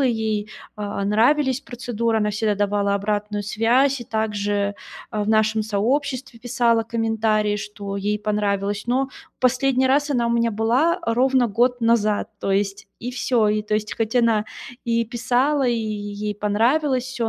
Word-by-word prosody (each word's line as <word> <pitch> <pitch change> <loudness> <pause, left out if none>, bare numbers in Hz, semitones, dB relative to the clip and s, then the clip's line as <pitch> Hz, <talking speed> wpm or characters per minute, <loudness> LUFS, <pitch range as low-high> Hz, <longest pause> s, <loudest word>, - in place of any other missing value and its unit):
ей, 220 -5 0 0.3
а, 205 -1 -4
нравились 260 +6 +2
процедуры, 235 -3 -2
она 210 -1 +1
всегда 210 0 0
давала 200 0 0
обратную 205 +1 -2
связь 245 +6 +2
и 240 - -7
также, 205 -2 -1 0.4
э, 215 - -1
в 205 - -3
нашем 220 0 +2
сообществе 245 +4 -1
писала 235 -2 +2
комментарии, 220 -2 0
что 200 -1 -6
ей 210 +1 -1
понравилось. 205 -1 -1
Но 265 +2 +1 0.3
в - - -56
последний 260 +1 +2
раз 285 +3 +2
она 240 -3 +1
у - - 0
меня 235 0 +2
была, 235 +10 +2
э, 335 -11 -2
ровно 255 0 +3
год 245 +3 +1
назад. 215 -2 +2
То - - -2
есть 195 0 -1
и 245 +1 -5
всё. 245 -3 +1
И 210 0 +1
то 210 0 -2
есть, 215 0 -2
хоть 225 +1 -1
она 225 -3 +3 0.4
и 230 0 +1
писала, 255 +5 +1
и 240 - +2
е 210 -2 -4
ей 210 0 -3
понравилось 245 +6 +1
всё, 245 -3 -3
225 Hz, 165 wpm, -22 LUFS, 210-245 Hz, 0.4 s, ровно